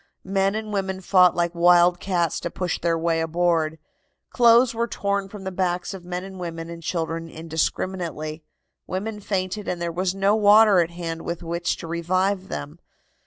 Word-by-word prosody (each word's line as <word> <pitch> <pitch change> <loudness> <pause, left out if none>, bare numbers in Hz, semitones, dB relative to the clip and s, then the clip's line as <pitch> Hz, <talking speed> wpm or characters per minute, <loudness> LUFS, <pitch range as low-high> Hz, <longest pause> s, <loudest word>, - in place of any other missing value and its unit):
Men 195 +1 +1
and 215 -1 -4
women 190 -1 -2
fought 180 -1 +4
like 170 0 0
wild 175 0 +5
cats 175 -4 0
to - - -4
push 180 0 -3
their 165 -1 +1
way 165 0 0
aboard. 165 -1 +1 0.5
Clothes 235 0 +5
were 235 +1 -1
torn 200 -2 -2
from 205 -1 -9
the 190 - -4
backs 180 0 -1
of 190 -2 -9
men 180 0 -4
and 190 -1 -9
women 165 -1 -6
and 170 0 -8
children 165 0 -3
indiscriminately. 160 -1 -3 0.4
Women 210 +3 -4
fainted, 195 0 -3
and 180 - -2
there 170 0 -2
was 185 +2 -1
no 195 +2 +3
water 210 -2 +6
at 170 -1 +2
hand 165 -1 -5
with 170 +1 -5
which 170 +1 -2
to - - -8
revive 185 +3 0
them. 75 +1 -6
180 Hz, 175 wpm, -23 LUFS, 170-195 Hz, 0.5 s, water